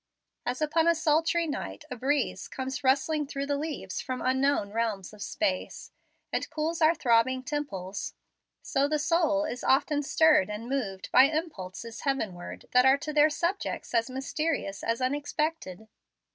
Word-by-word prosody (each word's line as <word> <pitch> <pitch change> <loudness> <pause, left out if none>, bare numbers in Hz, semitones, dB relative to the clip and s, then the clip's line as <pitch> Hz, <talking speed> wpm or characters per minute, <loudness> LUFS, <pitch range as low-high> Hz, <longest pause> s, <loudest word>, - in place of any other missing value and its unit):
As 250 +5 -1
upon 320 +2 +2
a 335 - +5
sultry 325 +2 +2
night 295 -1 -5
a - - -3
breeze 270 +3 -1
comes 265 +1 -5
rustling 280 +3 +2
through 275 0 -3
the 285 0 0
leaves 300 +1 -4
from 255 -1 -4
unknown 265 -5 +1
realms 215 -4 -2
of 210 - -13
space, 285 +2 -2 0.4
and - - -1
cools 320 +2 -2
our 320 +2 +5
throbbing 255 0 +2
temples, 205 -10 -4 0.5
so 275 0 +1
the 305 +1 +1
soul 310 -1 +2
is 250 -5 -5
often 290 +2 +3
stirred 305 - +4
and 210 +3 -5
moved 215 -8 -3
by 255 +2 +8
impulses 230 - -4
heavenward 215 -11 -3
that 250 0 +6
are 265 +1 +6
to 305 +2 -5
their 300 +1 +6
subjects 340 +1 -2
as 230 0 +2
mysterious 270 -5 -2
as 230 +2 -1
unexpected. 285 - -2
275 Hz, 155 wpm, -28 LUFS, 235-305 Hz, 0.5 s, by